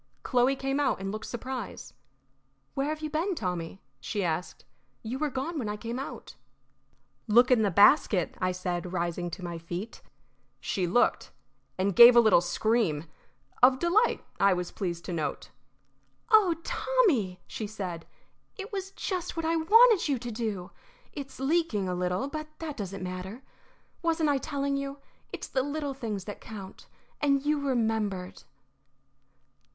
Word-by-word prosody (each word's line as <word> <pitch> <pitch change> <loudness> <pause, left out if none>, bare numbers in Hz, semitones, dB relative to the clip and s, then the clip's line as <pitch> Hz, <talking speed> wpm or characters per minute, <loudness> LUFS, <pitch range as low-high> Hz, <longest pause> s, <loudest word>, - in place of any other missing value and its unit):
Chloe 250 +2 +2
came 270 +1 -2
out 275 -8 +1
and 195 0 -4
looked 215 +1 -6
surprised. 250 -1 -6 0.8
"Where 275 +1 -1
have 310 0 -3
you 310 - -3
been, 345 +5 0
Tommy?" 180 - -4 0.2
she 205 -3 -3
asked. 170 +1 -3 0.4
"You 240 +4 -4
were 305 0 0
gone 285 +5 -3
when 220 -5 -3
I 210 - -3
came 235 +3 -5
out." 275 - -8 0.9
"Look 240 +4 +5
in 245 -3 +5
the 205 - +3
basket," 200 - +4
I 185 0 +1
said, 180 -1 -3
rising 175 -1 -2
to 180 +2 -8
my 170 -1 -5
feet. 175 +6 -6 0.6
She 185 -2 -1
looked, 220 +8 +2 0.5
and 190 0 0
gave 235 +3 +10
a - - +9
little 220 -7 +6
scream 185 -4 0 0.6
of 255 +1 +7
delight, 355 - +2
I 200 -1 +5
was 180 -1 -3
pleased 175 -3 -4
to 180 - -4
note. 155 -3 -3 0.8
"Oh, 405 -6 +6
Tommy!" 290 - +1
she 215 - -5
said. 185 -6 -6 0.5
"It 415 +2 -7
was 385 -1 -3
just 360 -3 -4
what 330 - -1
I 325 +1 +1
wanted 420 +3 +5
you 275 - +2
to 240 0 -6
do. 215 -5 -4 0.4
It's 275 -3 -8
leaking 270 - +1
a 180 - -1
little, 180 +7 -1
but 310 +1 -5
that 315 -3 -5
doesn't 195 -3 -5
matter. 185 +7 -6 0.6
Wasn't 325 -2 +1
I 280 -2 +2
telling 280 -1 -2
you? 275 0 -4 0.3
It's - - -6
the 265 - 0
little 290 +1 -3
things 220 -7 -4
that 205 - -8
count. 200 -4 -10 0.3
And 280 -1 +2
you 300 0 +2
remembered." 220 -8 -1
235 Hz, 155 wpm, -28 LUFS, 185-290 Hz, 0.9 s, gave